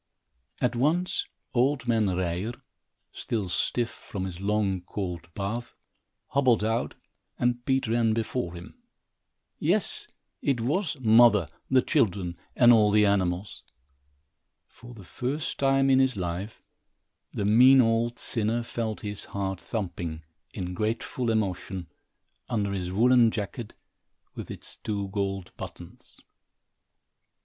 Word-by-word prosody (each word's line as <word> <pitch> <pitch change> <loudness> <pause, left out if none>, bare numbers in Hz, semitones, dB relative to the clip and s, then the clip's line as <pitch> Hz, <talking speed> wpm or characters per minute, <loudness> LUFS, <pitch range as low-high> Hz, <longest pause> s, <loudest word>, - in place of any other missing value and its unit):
At 125 0 +1
once, 160 +9 +1 0.3
old 130 +1 +1
man 115 -3 +3
Ryer, 90 +4 -1 0.6
still 105 -5 -3
stiff 120 +6 0
from 95 -2 -6
his 90 -2 -6
long, 100 -2 0
cold 90 -2 -5
bath, 115 +4 -4 0.5
hobbled 130 -6 +3
out, 115 +2 -1 0.4
and 120 0 0
Pete 135 -1 +1
ran 115 -1 +2
before 110 -5 -2
him. 85 +1 -11 0.8
Yes, - - 0 0.3
it 135 -4 +1
was 150 - -1
mother, 110 -6 +6 0.2
the 130 -1 +4
children 90 -4 +1 0.2
and 120 -1 +7
all 105 -2 +5
the 105 0 +4
animals! 95 -1 0 1.0
For 120 +1 -14
the 100 - -11
first 130 - -3
time 135 0 +3
in 130 - +5
his 130 -4 +2
life, 90 +4 -4 0.7
the 100 - -2
mean 125 +6 +7
old 115 0 +2
sinner 115 +1 -1
felt 115 -2 -4
his 105 -2 -6
heart 95 -2 -3
thumping, 85 -6 -4 0.3
in 90 0 -5
grateful 115 +4 -2
emotion, 95 -4 -2 0.6
under 105 -5 0
his 90 -2 -3
woolen 120 +3 +5
jacket, 110 +1 -5 0.6
with - - -8
its - - -8
two 100 -2 -3
gold 95 -2 -3
buttons. - - -11
110 Hz, 120 wpm, -27 LUFS, 95-120 Hz, 1.0 s, and